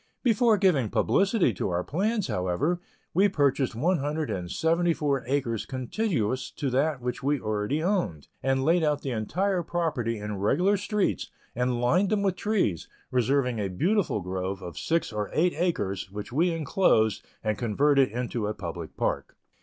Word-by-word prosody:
Before 230 -2 +4
giving 165 - +3
publicity 195 - +2
to 90 - -2
our 90 0 -1
plans, 205 - 0
however, 95 - -1 0.3
we 195 +4 +4
purchased 140 - +1
one 165 +8 +1
hundred 150 -1 -2
and 90 -3 -4
seventy 165 - +1
four 140 -4 0
acres 125 -5 -1
contiguous 130 - -1
to 140 -3 -2
that 140 +1 +1
which 125 +1 -3
we 140 +1 +1
already 110 +8 -1
owned, 175 - -1
and 135 0 +1
laid 165 +2 +3
out 150 -2 +1
the 135 - -2
entire 180 - 0
property 155 -10 -1
in 105 0 -4
regular 175 - +3
streets, 205 0 -1 0.3
and 125 0 0
lined 175 +11 +3
them 210 -2 +1
with 195 -2 +1
trees, 190 - 0 0.2
reserving 125 -1 +1
a 100 - 0
beautiful 165 - 0
grove 95 +1 -4
of 85 -2 -7
six 165 -7 -1
or 105 -1 -2
eight 175 +3 +2
acres, 100 - -1
which 105 +3 -6
we 165 +6 +3
inclosed, 155 - +2 0.2
and 110 -1 -1
converted 135 +3 +3
into 120 -1 -3
a 105 - -3
public 85 -4 -7
park. - - -2
135 Hz, 165 wpm, -27 LUFS, 110-175 Hz, 0.3 s, Before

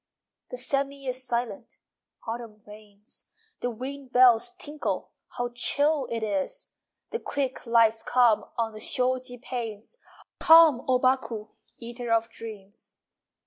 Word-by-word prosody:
II - - -63
The - - -6
sêmi 275 - -1
is 255 0 -3
silent 240 +1 -3 0.5
(Autumn 225 -1 -6
rains!) 210 -1 -15 0.3
The 245 - -2
wind 260 +3 -7
bells 250 +7 +5
tinkle 305 -4 -4 0.3
(How 245 0 -1
chill 285 +3 +1
it 230 -1 -3
is!) 200 -3 -3 0.4
The 460 - -2
quick 270 - -3
lights 225 -1 +4
come 245 -4 +3
On 225 -1 -1
the 215 - -9
shoji 250 +1 +1
panes. 235 - -6 0.4
Come, 320 -6 +7
O 255 -1 +4
Baku, 250 -4 0 0.3
Eater 235 0 -6
of 230 0 +1
dreams! 210 -2 -10
245 Hz, 130 wpm, -26 LUFS, 225-265 Hz, 0.5 s, Come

